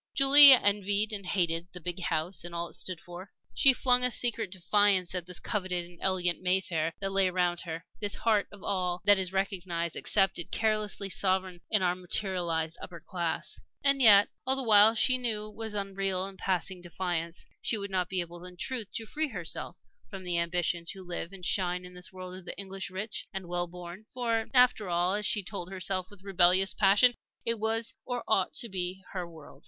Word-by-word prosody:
Julie 280 Hz, +1 st, +10 dB
envied 205 Hz, -2 st, +4 dB
and 200 Hz, -3 st, -3 dB
hated 170 Hz, -2 st, +1 dB
the 180 Hz, -, -7 dB
big 175 Hz, +2 st, -4 dB
house 165 Hz, +2 st, -2 dB
and 175 Hz, 0 st, -8 dB
all 170 Hz, 0 st, -3 dB
it -, -, -16 dB
stood 185 Hz, -3 st, -4 dB
for; 175 Hz, +2 st, -11 dB, 0.2 s
she 270 Hz, -, +6 dB
flung 250 Hz, -1 st, +4 dB
a 250 Hz, -, +5 dB
secret 230 Hz, -4 st, -1 dB
defiance 190 Hz, 0 st, +1 dB
at 180 Hz, -2 st, -4 dB
this 180 Hz, -1 st, -5 dB
coveted 185 Hz, -4 st, -2 dB
and 175 Hz, 0 st, -16 dB
elegant 180 Hz, -2 st, 0 dB
Mayfair 180 Hz, -3 st, 0 dB
that 195 Hz, -1 st, -3 dB
lay 195 Hz, -1 st, +2 dB
around 180 Hz, -1 st, 0 dB
her, 165 Hz, +1 st, -6 dB
this 205 Hz, -1 st, -2 dB
heart 215 Hz, -3 st, +1 dB
of 205 Hz, -1 st, -14 dB
all 180 Hz, -2 st, -2 dB
that 205 Hz, -1 st, +5 dB
is 185 Hz, -1 st, -1 dB
recognized, 180 Hz, -3 st, -2 dB
accepted, 195 Hz, -4 st, 0 dB
carelessly 215 Hz, -2 st, -1 dB
sovereign 185 Hz, -2 st, -1 dB
in 210 Hz, -3 st, +2 dB
our 180 Hz, -1 st, +2 dB
"materialized" 175 Hz, -3 st, -1 dB
upper 170 Hz, -2 st, -9 dB
class. 170 Hz, -4 st, -4 dB, 0.2 s
And 275 Hz, -1 st, +3 dB
yet 205 Hz, -4 st, +7 dB
all 265 Hz, +1 st, +2 dB
the 270 Hz, -, -1 dB
while 215 Hz, -1 st, +6 dB
she 255 Hz, +3 st, +3 dB
knew 225 Hz, -4 st, -1 dB
that 215 Hz, -, -7 dB
it 210 Hz, -, -17 dB
was 220 Hz, -1 st, -4 dB
an 200 Hz, -1 st, -2 dB
unreal 190 Hz, -1 st, -2 dB
and 195 Hz, 0 st, -8 dB
passing 185 Hz, -1 st, -1 dB
defiance. 175 Hz, -1 st, -4 dB, 0.2 s
She 225 Hz, -, -1 dB
would 200 Hz, -1 st, -6 dB
not 180 Hz, -2 st, -1 dB
be 185 Hz, -1 st, -1 dB
able 175 Hz, 0 st, -9 dB
in 180 Hz, 0 st, -11 dB
truth 240 Hz, 0 st, -5 dB
to 225 Hz, -, -4 dB
free 310 Hz, +7 st, -2 dB
herself 180 Hz, -, -6 dB, 0.3 s
from 195 Hz, -3 st, -8 dB
the 175 Hz, -1 st, -1 dB
ambition 170 Hz, 0 st, -1 dB
to 190 Hz, +2 st, -4 dB
live 175 Hz, 0 st, -5 dB
and 190 Hz, -2 st, -10 dB
shine 180 Hz, -1 st, -1 dB
in 180 Hz, -, -12 dB
this 180 Hz, 0 st, -11 dB
world 185 Hz, -1 st, -9 dB
of 185 Hz, -1 st, -12 dB
the -, -, -7 dB
English 195 Hz, -1 st, -6 dB
rich 195 Hz, +4 st, -6 dB
and 195 Hz, -2 st, -7 dB
well 175 Hz, 0 st, -2 dB
born. 175 Hz, +3 st, -10 dB
For, 230 Hz, -3 st, -2 dB
after 250 Hz, -6 st, +3 dB
all, 175 Hz, +2 st, +1 dB
as 210 Hz, 0 st, 0 dB
she 205 Hz, -, 0 dB
told 180 Hz, -1 st, -6 dB
herself 185 Hz, -1 st, -3 dB
with 205 Hz, -2 st, -15 dB
rebellious 185 Hz, 0 st, +3 dB
passion, 205 Hz, +5 st, +4 dB, 0.3 s
it 230 Hz, -1 st, +2 dB
was 225 Hz, +3 st, -1 dB
or 245 Hz, -1 st, -4 dB
ought 195 Hz, -4 st, +1 dB
to 235 Hz, -, 0 dB
be 185 Hz, -1 st, -2 dB
her 180 Hz, -3 st, -5 dB
world. 160 Hz, -3 st, -14 dB
190 Hz, 205 wpm, -29 LUFS, 175-210 Hz, 0.3 s, Julie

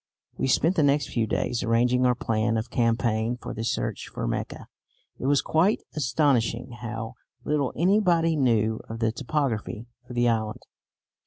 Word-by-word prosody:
We -, -, -1 dB
spent 165 Hz, +7 st, +2 dB
the -, -, +4 dB
next 145 Hz, -1 st, +2 dB
few 115 Hz, -2 st, 0 dB
days 100 Hz, +5 st, -1 dB
arranging 125 Hz, +2 st, +2 dB
our 125 Hz, -, +3 dB
plan 115 Hz, -1 st, 0 dB
of 110 Hz, +2 st, -4 dB
campaign 115 Hz, 0 st, +1 dB
for -, -, -6 dB
the 115 Hz, -, -4 dB
search 115 Hz, -, -2 dB
for -, -, -3 dB
Mecca. -, -, -4 dB, 0.5 s
It 130 Hz, -, -2 dB
was 140 Hz, 0 st, +3 dB
quite 180 Hz, +7 st, +2 dB
astonishing 125 Hz, -5 st, +1 dB
how 115 Hz, -1 st, -5 dB, 0.3 s
little 145 Hz, -3 st, 0 dB
anybody 175 Hz, -3 st, +3 dB
knew 110 Hz, -5 st, +2 dB
of 115 Hz, -, -5 dB
the 115 Hz, -1 st, +1 dB
topography 115 Hz, -3 st, -2 dB, 0.2 s
of 125 Hz, -, -7 dB
the 120 Hz, 0 st, +3 dB
island. 110 Hz, -2 st, -1 dB
120 Hz, 160 wpm, -26 LUFS, 115-145 Hz, 0.5 s, the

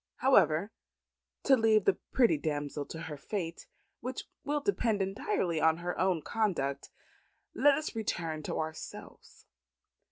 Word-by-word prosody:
However, 195 Hz, -, +3 dB, 0.7 s
to 270 Hz, -, +6 dB
leave 220 Hz, -4 st, +3 dB
the 195 Hz, -, +3 dB
pretty 235 Hz, -10 st, +4 dB
damsel 145 Hz, -1 st, -3 dB
to 165 Hz, -, -7 dB
her 160 Hz, -3 st, -6 dB
fate, 170 Hz, +1 st, -5 dB, 0.3 s
which 255 Hz, +1 st, -5 dB, 0.2 s
will 295 Hz, +1 st, 0 dB
depend 235 Hz, -, 0 dB
entirely 190 Hz, -4 st, -1 dB
on 160 Hz, +1 st, +4 dB
her 175 Hz, +1 st, -3 dB
own 185 Hz, -5 st, +1 dB
conduct, 160 Hz, -11 st, -1 dB, 0.6 s
let 290 Hz, -1 st, +5 dB
us 310 Hz, -4 st, -4 dB
return 165 Hz, -8 st, -2 dB
to -, -, -4 dB
ourselves. 160 Hz, 0 st, -8 dB
180 Hz, 130 wpm, -31 LUFS, 160-225 Hz, 0.7 s, to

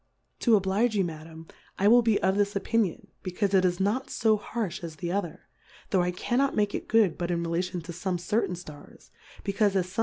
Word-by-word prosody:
To 230 Hz, -3 st, +4 dB
oblige 205 Hz, +4 st, +1 dB
you, 195 Hz, -, +3 dB
Madam, 160 Hz, -1 st, -8 dB, 0.3 s
I 200 Hz, -, +2 dB
will 240 Hz, +3 st, +7 dB
be 225 Hz, -3 st, +2 dB
of 190 Hz, 0 st, +3 dB
this 205 Hz, 0 st, +1 dB
Opinion, 200 Hz, -1 st, -1 dB
becaufe 190 Hz, +2 st, -1 dB
it 190 Hz, -1 st, +5 dB
is 180 Hz, 0 st, +1 dB
not 210 Hz, +7 st, 0 dB
fo 220 Hz, -1 st, +2 dB
harfh 205 Hz, -5 st, -4 dB
as 165 Hz, -2 st, -6 dB
the 170 Hz, +2 st, -4 dB
other, 185 Hz, -4 st, -3 dB, 0.5 s
tho' 190 Hz, -, +3 dB
I 175 Hz, -, +1 dB
cannot 245 Hz, +9 st, 0 dB
make 205 Hz, -1 st, +1 dB
it -, -, -4 dB
good 215 Hz, -7 st, +3 dB
but 175 Hz, -1 st, -2 dB
in 170 Hz, -1 st, 0 dB
relation 175 Hz, +2 st, -2 dB
to 165 Hz, +2 st, -8 dB
fome 175 Hz, +1 st, -3 dB
certain 180 Hz, +1 st, 0 dB
Stars, 155 Hz, -4 st, -13 dB, 0.3 s
becaufe 200 Hz, 0 st, +1 dB
as 185 Hz, -2 st, +2 dB
fome 185 Hz, +4 st, -7 dB
190 Hz, 210 wpm, -27 LUFS, 175-210 Hz, 0.5 s, will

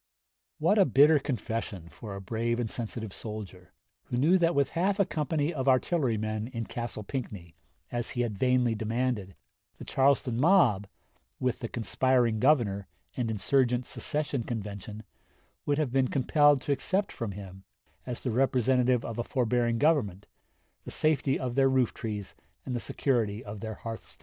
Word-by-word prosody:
What 170 Hz, +7 st, +3 dB
a 195 Hz, -, +7 dB
bitter 145 Hz, +4 st, +6 dB
confession 115 Hz, -, -4 dB
for 100 Hz, +3 st, -9 dB
a 100 Hz, -, -6 dB
brave 115 Hz, +4 st, -1 dB
and 115 Hz, -3 st, -2 dB
sensitive 110 Hz, -3 st, -5 dB
soldier, 100 Hz, -4 st, -7 dB, 0.3 s
who 120 Hz, -, -3 dB
knew 165 Hz, +9 st, +4 dB
that 170 Hz, 0 st, +2 dB
with 140 Hz, -1 st, +2 dB
half 190 Hz, +4 st, 0 dB
a 200 Hz, -, +5 dB
company 155 Hz, 0 st, -1 dB
of 135 Hz, -3 st, -3 dB
artillerymen 115 Hz, -6 st, +1 dB
in 115 Hz, -3 st, -5 dB
Castle 120 Hz, -2 st, -5 dB
Pinckney, 100 Hz, -, -6 dB, 0.4 s
as 120 Hz, -1 st, -2 dB
he 120 Hz, -, -2 dB
had 115 Hz, -4 st, -1 dB
vainly 125 Hz, -2 st, +3 dB
demanded, 110 Hz, -3 st, -2 dB, 0.4 s
the -, -, -9 dB
Charleston 130 Hz, -3 st, +2 dB
mob, 135 Hz, -, +4 dB, 0.5 s
with 125 Hz, -2 st, -1 dB
the 115 Hz, -, -4 dB
conspiring 120 Hz, 0 st, +1 dB
Governor 110 Hz, -8 st, +2 dB, 0.3 s
and 120 Hz, -3 st, -1 dB
insurgent 125 Hz, +3 st, +1 dB
secession 145 Hz, -4 st, -2 dB
convention, 105 Hz, -1 st, -6 dB, 0.6 s
would 145 Hz, -1 st, +2 dB
have 150 Hz, -5 st, 0 dB
been 130 Hz, 0 st, +2 dB
compelled 145 Hz, +2 st, +3 dB
to 145 Hz, -, -2 dB
accept 190 Hz, +8 st, 0 dB
from 110 Hz, -4 st, -4 dB
him, 95 Hz, -1 st, -10 dB, 0.4 s
as 125 Hz, -2 st, -5 dB
the 125 Hz, -, -1 dB
representative 125 Hz, 0 st, +2 dB
of 115 Hz, 0 st, -5 dB
a -, -, 0 dB
forbearing 120 Hz, -2 st, +1 dB
Government, 115 Hz, -, +1 dB, 0.6 s
the -, -, -8 dB
safety 145 Hz, -3 st, +1 dB
of 125 Hz, -2 st, -3 dB
their 135 Hz, +1 st, +4 dB
roof 130 Hz, -3 st, +2 dB
trees 105 Hz, -3 st, -5 dB, 0.3 s
and 125 Hz, -, -3 dB
the -, -, -1 dB
security 115 Hz, -6 st, -1 dB
of 105 Hz, 0 st, -7 dB
their 110 Hz, 0 st, -5 dB
hearthstones. 115 Hz, +1 st, -8 dB
120 Hz, 160 wpm, -29 LUFS, 110-135 Hz, 0.6 s, a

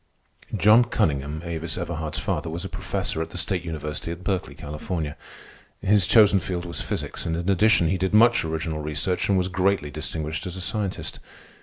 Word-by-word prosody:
John 110 Hz, +5 st, +6 dB
Cunningham, 75 Hz, -, -1 dB
Avis 80 Hz, -1 st, -3 dB
Everhard's 80 Hz, -2 st, -3 dB
father, 85 Hz, -, -2 dB
was 85 Hz, +3 st, -4 dB
a -, -, -5 dB
professor 80 Hz, -, -2 dB
at 80 Hz, -, -3 dB
the -, -, -8 dB
State 90 Hz, -2 st, -1 dB
University 75 Hz, -1 st, -5 dB
at 85 Hz, +2 st, -7 dB
Berkeley, 95 Hz, -1 st, -2 dB
California. 75 Hz, +1 st, -4 dB, 0.6 s
His 100 Hz, -1 st, +4 dB
chosen 105 Hz, -3 st, +6 dB
field 90 Hz, -1 st, -3 dB
was 85 Hz, -, -4 dB
physics, -, -, -4 dB
and 80 Hz, 0 st, -1 dB
in 85 Hz, +1 st, -4 dB
addition 95 Hz, -2 st, +4 dB
he 95 Hz, +2 st, 0 dB
did 95 Hz, +1 st, 0 dB
much 115 Hz, +2 st, +5 dB
original 80 Hz, -1 st, -3 dB
research 75 Hz, +6 st, -1 dB
and 100 Hz, -, +4 dB
was 90 Hz, 0 st, +1 dB
greatly 95 Hz, -4 st, +1 dB
distinguished 80 Hz, +5 st, -4 dB
as 90 Hz, +1 st, -5 dB
a -, -, -5 dB
scientist. 100 Hz, +1 st, -3 dB
85 Hz, 180 wpm, -25 LUFS, 80-95 Hz, 0.6 s, John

